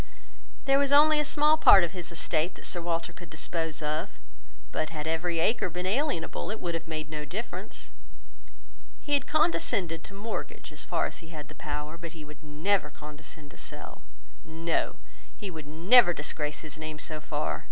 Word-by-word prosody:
There 275 0 +5
was 280 -1 +2
only 300 +1 +7
a - - +3
small 300 +1 +4
part 195 - +9
of 170 - 0
his 180 -3 -4
estate 165 0 0
that - - -7
Sir 175 - 0
Walter 170 0 -2
could 175 -1 -12
dispose 160 0 -3
of; 150 +1 -1 0.6
but 155 - -1
had 155 -2 -5
every 165 +2 0
acre 185 +4 +2
been 180 +2 -4
alienable, 210 - 0
it 215 - -4
would 175 -1 -2
have 165 0 -4
made 155 -2 -3
no 155 -1 -4
difference. 200 +10 -6 1.1
He 290 - -3
had 285 - +3
condescended 200 - +1
to 200 - -9
mortgage 215 +3 -5
as - - -4
far - - +1
as - - -5
he 165 - -12
had 150 -3 -8
the - - -9
power, 150 +2 -5
but 170 -1 -7
he 155 -3 -9
would 150 -1 -13
never 155 +3 +1
condescend 150 0 -11
to - - -15
sell. - - -9 0.4
No; 165 +1 -1 0.4
he 200 -3 -5
would 155 -3 -8
never 175 +6 +6
disgrace 150 -1 -3
his 155 -1 -5
name 155 -1 -5
so 155 +1 -4
far. - - -2
165 Hz, 185 wpm, -29 LUFS, 155-195 Hz, 1.1 s, part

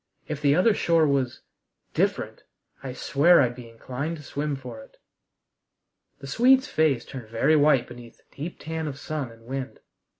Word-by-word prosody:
If 150 -1 -5
the 145 -1 +4
other 195 +6 +4
shore 165 -5 +3
was 135 -4 0 0.5
different, - - -1 0.4
I 135 - -5
swear 155 +7 +4
I'd 125 -3 +2
be 120 -1 -11
inclined 130 +8 -5
to 150 - -12
swim 145 0 -3
for 125 -4 -9
it!" - - -18 1.2
The - - -8
Swede's 260 - +4
face 150 - +1
turned 125 -5 -9
very 135 +7 +2
white 145 -4 +4
beneath 120 -1 -12
the - - -30
deep 160 +5 -6
tan 160 0 -4
of 140 -2 -5
sun 145 -5 -4
and 115 0 -17
wind. 135 +2 -6
140 Hz, 170 wpm, -25 LUFS, 125-155 Hz, 1.2 s, the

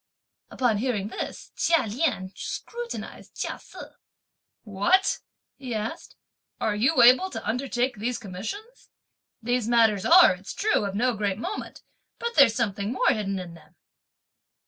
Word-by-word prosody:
Upon 235 -5 0
hearing 215 -5 -1
this, - - -6
Chia 330 -6 +2
Lien 220 - -1
scrutinised 475 0 -7
Chia - - -4
Se. - - -12 0.8
"What!" 230 - +2 0.4
he 255 -4 -5
asked, 220 +9 -5 0.4
"are 215 - 0
you 245 +4 +3
able 255 +11 +6
to - - -7
undertake 245 +1 -1
these 235 +4 -2
commissions? 235 - -8 0.5
These 245 -1 0
matters 225 -5 +3
are, 345 - +7
it's 185 +2 -9
true, 425 - +1
of 200 -1 -4
no 245 +4 +1
great 205 -3 -2
moment; 370 - -6 0.3
but 470 0 -3
there's 275 - +6
something 205 -1 -1
more 250 0 +2
hidden 195 -2 -1
in 180 -2 -7
them!" 165 - -18
235 Hz, 140 wpm, -26 LUFS, 205-275 Hz, 0.8 s, are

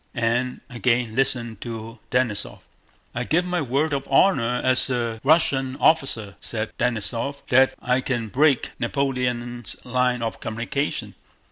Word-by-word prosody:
and 120 +2 0
again 120 -2 0
listened 120 -5 0
to 115 -1 -7
Denísov. 125 -5 -1 0.5
"I 120 - -2
give 170 +7 +1
my 180 -1 -1
word 145 +3 0
of 140 -1 -2
honor 125 -6 +3
as 130 +1 +3
a 115 -3 -2
Wussian 135 -3 +3
officer," 135 - +2
said 110 -1 -4
Denísov, 120 +4 -1
"that 130 0 +4
I 125 +1 +2
can 120 -4 -2
bweak 140 +2 +2
Napoleon's 120 -2 -2
line 125 -1 +1
of 115 - -3
communication!" 120 +6 -3
125 Hz, 130 wpm, -23 LUFS, 115-135 Hz, 0.5 s, that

